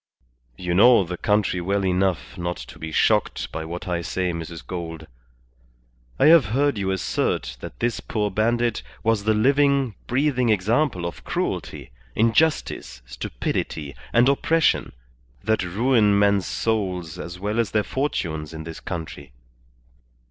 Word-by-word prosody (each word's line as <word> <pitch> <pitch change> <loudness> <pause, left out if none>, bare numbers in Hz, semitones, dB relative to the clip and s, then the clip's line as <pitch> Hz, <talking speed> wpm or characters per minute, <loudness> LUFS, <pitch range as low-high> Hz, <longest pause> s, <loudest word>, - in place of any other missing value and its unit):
You 90 -1 -2
know 115 +3 +6
the 90 0 -5
country 105 -1 +1
well 100 +2 0
enough 95 -1 0
not 85 0 -3
to - - -11
be 80 0 -6
shocked - - +1
by 80 - -4
what 85 +3 -6
I 85 -1 -1
say, 90 +1 -2
Mrs. 85 0 -7
Gould. 80 -3 -6 1.1
I - - +3
have 160 -2 +7
heard 135 +2 +1
you 95 -1 -1
assert 85 -8 -1
that - - -9
this 120 0 0
poor 105 -2 -2
bandit 115 +2 +1 0.2
was 110 -2 +1
the 110 0 +3
living, 140 +1 +3
breathing 130 -2 +1
example 110 - +1
of 85 - -6
cruelty, - - -3 0.2
injustice, 115 - +1
stupidity, - - -4 0.2
and 120 +2 +4
oppression, 160 +4 +2 0.5
that 110 +2 +1
ruin 105 +2 +3
men's 100 -2 +3
souls 90 -6 -2
as 85 0 -7
well 105 +4 -1
as 115 -4 +1
their 105 +1 +1
fortunes 80 - -3
in 80 - -6
this 80 0 -8
country. 80 -7 -7
100 Hz, 140 wpm, -23 LUFS, 85-115 Hz, 1.1 s, have